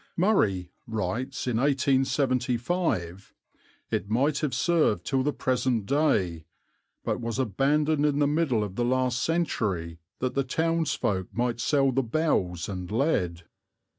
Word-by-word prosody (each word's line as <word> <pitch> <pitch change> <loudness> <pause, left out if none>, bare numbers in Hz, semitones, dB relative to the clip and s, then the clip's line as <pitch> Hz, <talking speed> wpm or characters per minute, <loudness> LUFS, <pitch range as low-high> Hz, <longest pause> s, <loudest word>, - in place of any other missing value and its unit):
"Murray" 100 - +2 0.2
writes 115 +5 -3
in 125 -3 0
1875: 130 - 0 0.6
"It 100 - -2
might 140 +6 +1
have 150 -3 -1
served 150 - +2
till 135 -1 +1
the 145 +3 +1
present 125 -5 0
day, 100 - +1 0.6
but - - -2
was 115 0 -3
abandoned 145 +6 +2
in 145 -1 0
the 145 - +3
middle 145 -7 +1
of 100 -2 -6
the 120 - +1
last 125 0 +1
century 100 - -1 0.2
that 130 0 -2
the 140 - +1
townsfolk 150 - 0
might 120 +3 -1
sell 135 +2 +2
the 135 +2 +1
bells 110 - 0
and 90 -3 -5
lead." 95 - 0
130 Hz, 135 wpm, -27 LUFS, 105-145 Hz, 0.6 s, the